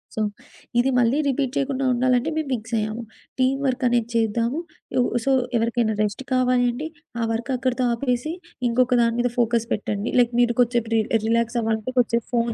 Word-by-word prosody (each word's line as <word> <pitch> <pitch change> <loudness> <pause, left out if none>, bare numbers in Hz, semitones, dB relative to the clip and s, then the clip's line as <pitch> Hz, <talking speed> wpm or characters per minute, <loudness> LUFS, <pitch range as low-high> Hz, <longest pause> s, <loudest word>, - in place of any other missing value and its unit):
So, 220 - -1 0.6
ఇది 260 +2 +3
మళ్ళీ 245 +4 +2
repeat 265 -1 0
చెయకుండా 270 -1 -1
ఉండాలంటే, 250 +3 +2
మేం 315 -2 -1
ఫిక్సయ్యాము. 225 0 -2 0.4
టీమ్ 265 +1 +2
వర్కనేది 245 -3 +1
చేద్దాము, 230 +5 +1 0.4
ఇవ్ 245 - +3 0.2
సో, 275 - +3 0.3
ఎవరికైనా 230 -1 +1
రెస్ట్ 205 +5 -2
కావాలి 250 -1 +3
అంటే, 290 +6 -5 0.3
ఆ 230 - 0
వర్కక్కడతో 255 +2 -1
ఆపేసి, 250 +5 -1 0.4
ఇంకొక 250 +1 +2
దాని 230 0 +2
మీద 245 -1 0
ఫోకస్ 235 -1 +2
పెట్టండి. 210 +1 -2
లైక్ 240 0 +3
మీరు 240 -1 +2
కొద్దిసేపు 235 -2 +2
రి - - +4 0.3
రిలాక్సవ్వాలంటే 230 0 0
కొంచేపు 235 -1 +2
ఫోన్ 235 -1 +1
240 Hz, 155 wpm, -23 LUFS, 230-255 Hz, 0.6 s, రి